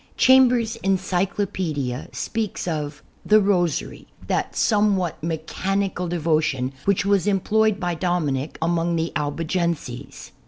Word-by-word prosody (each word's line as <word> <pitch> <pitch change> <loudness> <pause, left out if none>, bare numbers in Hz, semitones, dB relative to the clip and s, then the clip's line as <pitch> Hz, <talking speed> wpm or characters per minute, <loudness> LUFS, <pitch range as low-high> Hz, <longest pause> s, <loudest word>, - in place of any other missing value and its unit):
Chambers's 245 -3 +5
"Encyclopedia" 185 - -1
speaks 220 -5 -3
of 150 -3 -3 0.2
"The 215 0 +5
Rosary, 180 -5 0 0.2
that - - -1
somewhat 205 -6 +1
mechanical 180 +3 -2
devotion, 155 -6 0
which 200 -1 +2
was 200 -1 +2
employed 210 +1 +2
by 175 -2 -1
Dominic 160 -5 -1
among 170 0 +1
the 165 0 -1
Albigenses." 155 -3 -3
175 Hz, 105 wpm, -23 LUFS, 160-200 Hz, 0.2 s, Chambers's